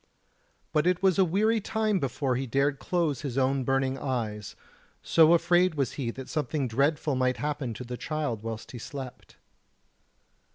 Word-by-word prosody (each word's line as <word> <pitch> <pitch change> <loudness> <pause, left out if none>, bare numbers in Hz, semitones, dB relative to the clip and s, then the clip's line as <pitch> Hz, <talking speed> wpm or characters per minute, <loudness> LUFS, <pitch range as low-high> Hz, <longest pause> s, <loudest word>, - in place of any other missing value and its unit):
But 155 +2 +2
it 180 +1 +1
was 190 -1 +3
a - - +7
weary 215 +6 +2
time 215 -1 0
before 135 -2 -1
he 130 +2 -2
dared 140 +3 +1
close 165 -7 -1
his 135 -4 -4
own 135 0 +2
burning 135 +1 0
eyes, 110 -6 -3 0.5
so 165 0 +5
afraid 175 0 +3
was 135 -4 0
he 130 -5 -3
that 130 +2 -7
something 150 -2 -1
dreadful 145 +5 +1
might 130 -1 +1
happen 145 -6 -3
to 125 - -6
the 125 0 -6
child 150 -9 -3
whilst 115 0 -6
he 120 - -8
slept. 130 +1 -8
140 Hz, 165 wpm, -28 LUFS, 125-165 Hz, 0.5 s, a